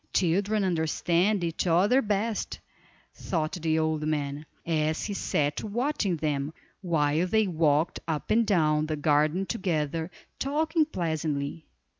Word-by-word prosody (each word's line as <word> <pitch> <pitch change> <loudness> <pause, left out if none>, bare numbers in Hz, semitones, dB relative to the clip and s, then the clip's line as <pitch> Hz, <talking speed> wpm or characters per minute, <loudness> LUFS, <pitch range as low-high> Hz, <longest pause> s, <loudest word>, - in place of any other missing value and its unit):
Children 200 +4 +2
understand 175 +3 +1
each 170 +2 -1
other 195 +10 +4
best, 210 0 -2 0.5
thought 155 -4 -2
the 160 -3 0
old 160 -1 0
man, 150 -1 -2 0.2
as 155 -1 0
he 205 - -3
sat 150 -6 -1
watching 220 - -1
them, 145 0 -2 0.3
while 160 -1 +1
they 220 +3 +3
walked 160 -3 +1
up 155 -2 -3
and 230 +2 +4
down 155 -5 +2
the 155 - -1
garden 150 +5 +2
together, 160 -2 -1 0.3
talking 310 +3 +1
pleasantly. 160 - -3
165 Hz, 125 wpm, -27 LUFS, 155-195 Hz, 0.5 s, other